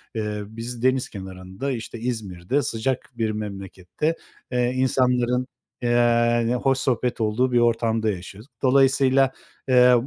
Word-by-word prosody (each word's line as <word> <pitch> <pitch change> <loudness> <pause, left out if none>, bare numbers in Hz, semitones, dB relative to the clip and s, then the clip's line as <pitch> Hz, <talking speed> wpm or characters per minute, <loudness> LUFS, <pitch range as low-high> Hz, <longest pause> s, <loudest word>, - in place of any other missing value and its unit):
Eee, 105 -1 -2
biz 115 +2 -7
deniz 130 0 +2
kenarında, 95 +5 -6
işte, 115 -1 -5
İzmir'de 110 0 -2
sıcak 125 +1 -2
bir 110 -2 0
memlekette, 100 - -4 0.4
eee, 125 -1 +1
insanların, 125 -1 +1 0.3
eee, 120 0 +3
hoş 135 -1 +3
sohbet 125 -2 0
olduğu 115 +4 +1
bir 120 - +4
ortamda 115 -1 +1
yaşıyoruz. 100 +6 -9
Dolayısıyla, 135 0 +4 0.4
eee, 125 -1 +6
120 Hz, 120 wpm, -23 LUFS, 110-130 Hz, 0.4 s, eee